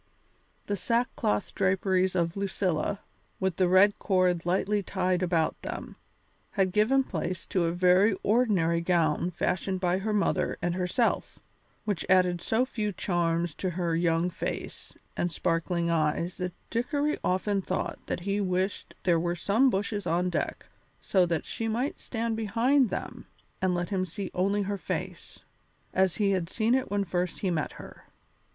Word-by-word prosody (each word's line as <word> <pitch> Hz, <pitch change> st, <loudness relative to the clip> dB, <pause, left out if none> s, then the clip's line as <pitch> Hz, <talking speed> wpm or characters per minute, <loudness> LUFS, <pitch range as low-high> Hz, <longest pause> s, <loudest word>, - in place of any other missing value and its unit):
The 205 Hz, -, -1 dB
sackcloth 230 Hz, -, 0 dB
draperies 190 Hz, 0 st, +1 dB
of 170 Hz, -1 st, 0 dB
Lucilla, 195 Hz, -1 st, -1 dB, 0.4 s
with 190 Hz, -3 st, -1 dB
the 185 Hz, -, +3 dB
red 190 Hz, +3 st, +5 dB
cord 180 Hz, -3 st, +1 dB
lightly 195 Hz, +3 st, +1 dB
tied 185 Hz, -1 st, 0 dB
about 170 Hz, -3 st, 0 dB
them, -, -, -6 dB, 0.6 s
had 190 Hz, -3 st, +2 dB
given 220 Hz, +7 st, +3 dB
place 175 Hz, -4 st, -4 dB
to 180 Hz, -3 st, 0 dB
a 165 Hz, -, +1 dB
very 185 Hz, +4 st, +4 dB
ordinary 195 Hz, -8 st, +2 dB
gown 170 Hz, -1 st, +1 dB
fashioned 185 Hz, +2 st, -1 dB
by 180 Hz, 0 st, +1 dB
her 215 Hz, +3 st, -2 dB
mother 210 Hz, -1 st, +1 dB
and 175 Hz, 0 st, -1 dB
herself, 185 Hz, +6 st, 0 dB, 0.5 s
which 205 Hz, -4 st, -1 dB
added 180 Hz, -2 st, +4 dB
so 230 Hz, +3 st, +1 dB
few 215 Hz, -5 st, -2 dB
charms 170 Hz, -3 st, 0 dB
to 185 Hz, -, -2 dB
her 170 Hz, -1 st, -1 dB
young 170 Hz, +1 st, +1 dB
face 170 Hz, -, -5 dB, 0.2 s
and 175 Hz, -, -1 dB
sparkling 170 Hz, +1 st, 0 dB
eyes 165 Hz, +2 st, 0 dB
that 180 Hz, -1 st, -3 dB, 0.2 s
Dickory 285 Hz, +6 st, 0 dB
often 195 Hz, +2 st, +1 dB
thought 185 Hz, 0 st, -3 dB
that -, -, -2 dB
he 200 Hz, +2 st, -1 dB
wished 185 Hz, +1 st, -2 dB
there 170 Hz, -3 st, +3 dB
were 170 Hz, +1 st, -1 dB
some 220 Hz, +9 st, +3 dB
bushes 205 Hz, -1 st, -2 dB
on 180 Hz, +2 st, +1 dB
deck -, -, -2 dB, 0.3 s
so 185 Hz, -3 st, +2 dB
that 165 Hz, -2 st, -1 dB
she 225 Hz, -, -3 dB
might 240 Hz, +6 st, -1 dB
stand 230 Hz, -1 st, -2 dB
behind 235 Hz, +4 st, +2 dB
them -, -, -5 dB, 0.3 s
and 185 Hz, -1 st, +2 dB
let 175 Hz, 0 st, -2 dB
him 190 Hz, -2 st, 0 dB
see 185 Hz, +2 st, -6 dB
only 200 Hz, +3 st, +1 dB
her 200 Hz, 0 st, -3 dB
face, -, -, -5 dB, 0.5 s
as 190 Hz, -2 st, +2 dB
he 200 Hz, -2 st, +2 dB
had 180 Hz, -3 st, -1 dB
seen 225 Hz, +4 st, +1 dB
it 260 Hz, 0 st, +1 dB
when 205 Hz, 0 st, 0 dB
first 180 Hz, -1 st, -2 dB
he 190 Hz, -, 0 dB
met 155 Hz, -3 st, -1 dB
her. -, -, -12 dB
185 Hz, 160 wpm, -28 LUFS, 175-205 Hz, 0.6 s, red